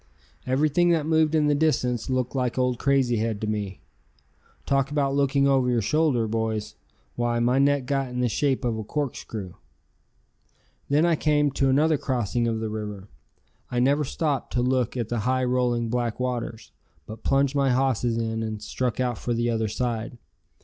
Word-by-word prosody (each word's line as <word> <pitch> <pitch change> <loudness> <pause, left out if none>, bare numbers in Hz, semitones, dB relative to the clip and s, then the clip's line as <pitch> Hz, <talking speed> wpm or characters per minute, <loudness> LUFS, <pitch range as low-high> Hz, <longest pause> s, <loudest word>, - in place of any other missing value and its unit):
Everything 150 +6 +2
that 165 -3 +2
moved 160 0 +2
in 155 -1 +3
the 150 - +3
distance 130 -6 0
looked 130 -1 -1
like 125 -2 -1
old 125 -1 +1
Crazy 135 -4 +2
Head 110 -1 -1
to - - -1
me. 105 -3 -3 0.8
Talk 135 -1 +1
about 140 -2 0
looking 140 0 +2
over 135 -2 +3
your 120 -3 +1
shoulder, 140 -2 +2
boys; 110 -1 -2 0.4
why, 120 0 0
my 120 +3 +2
neck 140 -1 +2
got 135 0 -1
in 125 0 -4
the 125 - +2
shape 135 +2 0
of 115 -2 -1
a - - -4
corkscrew. 110 - -4 1.4
Then 150 +4 +3
I 170 -1 +3
came 150 -1 +2
to 135 0 +1
another 150 +3 +3
crossing 120 -2 -1
of 115 -1 -1
the 110 - -2
river. 105 -2 -6 0.6
I 125 - -1
never 140 +4 +3
stopped 145 0 -2
to 125 - +1
look 125 -1 0
at 115 -3 -2
the 120 - -1
high 130 +4 0
rolling 125 -2 +1
black 120 -1 -2
waters, 120 -3 -4 0.3
but 110 +1 -9
plunged 135 0 +2
my 140 -1 +2
hosses 125 -3 +1
in 115 -1 -2
and 110 -1 -4
struck 120 +3 -3
out 125 -4 -1
for 120 - -2
the 120 +1 0
other 110 -1 0
side. 115 +1 -3
125 Hz, 180 wpm, -25 LUFS, 115-140 Hz, 1.4 s, in